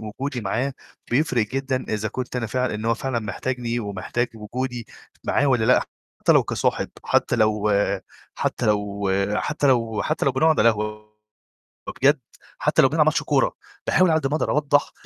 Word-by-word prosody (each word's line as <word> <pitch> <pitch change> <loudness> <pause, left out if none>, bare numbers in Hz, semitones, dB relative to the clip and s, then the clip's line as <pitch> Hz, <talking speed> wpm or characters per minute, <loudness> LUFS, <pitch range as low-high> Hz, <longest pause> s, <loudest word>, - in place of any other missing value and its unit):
وجودي 125 +5 -4
معاه، 120 +7 -1 0.4
بيفرق 125 -4 +2
جدًا 135 +1 -2
إذا 110 0 -1
كنت 125 +3 -5
أنا 120 -2 -1
فعلًا 125 +1 -1
إن 105 +1 -5
هو 115 0 +2
فعلًا 125 0 -2
محتاجني 120 +3 -3
ومحتاج 105 +4 -2
وجودي 120 +2 -5 0.4
معاه 145 - +2
والّا 125 -5 +2
لأ. 125 - +5 0.4
حتّى - - +4
لو - - +5
كصاحب - - -1 0.2
حتّى - - +2
لو 105 -1 +2 0.6
حتى - - -1
لو 105 -1 0 0.3
حتّى 150 +4 -1
لو 115 -5 +2
حتّى 155 - -1
لو 135 - +3
بنقعد 155 +4 +3
على 115 - +6
قهوة، 105 0 -5 0.8
وبجد - - +2 0.4
حتّى - - +3
لو 135 - +6
بنلعب 150 +2 +2
ماتش 155 -1 +2
كورة، 145 -2 +1 0.3
باحاول 185 -1 +4
على 160 0 +3
قد 140 - -2
ما 145 - -2
أقدر - - -1
أوضّح 145 -1 +2
120 Hz, 170 wpm, -23 LUFS, 110-135 Hz, 0.8 s, على